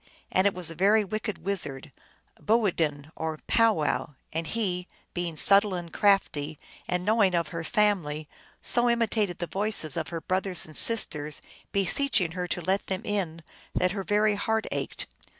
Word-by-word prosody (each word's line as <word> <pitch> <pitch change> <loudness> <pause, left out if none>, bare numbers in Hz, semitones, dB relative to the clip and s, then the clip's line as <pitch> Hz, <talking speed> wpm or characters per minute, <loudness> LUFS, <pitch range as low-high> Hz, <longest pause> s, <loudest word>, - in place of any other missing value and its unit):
And 185 +2 +4
it 200 - 0
was 180 -2 +1
a - - -5
very 205 +6 +4
wicked 215 +1 -4
wizard, 150 -8 -3 0.4
a - - -26
boo 220 -2 +3
din, 150 -3 -2
or 160 -1 -3
pow 230 -1 +4
wow; 150 -2 -2 0.2
and 165 0 -2
he, 185 -5 -1 0.3
being 175 -2 -2
subtle 200 +4 +5
and 175 -2 -6
crafty, 155 -7 +2 0.3
and 180 0 -1
knowing 210 -4 +3
of 170 -2 0
her 165 -1 -5
family, 170 -8 +1 0.4
so 240 0 +3
imitated 225 -5 +1
the 175 - -3
voices 195 -5 -1
of - - -2
her 170 - -4
brothers 185 0 0
and 155 - -12
sisters, 150 -10 +3 0.3
beseeching 195 -2 +1
her 180 +1 -3
to 175 - -2
let 190 +4 0
them 190 -1 -3
in, 175 -6 -2 0.3
that 180 0 +2
her 195 0 -3
very 210 +1 +2
heart 220 +2 -1
ached. - - -2
185 Hz, 170 wpm, -27 LUFS, 165-210 Hz, 0.4 s, subtle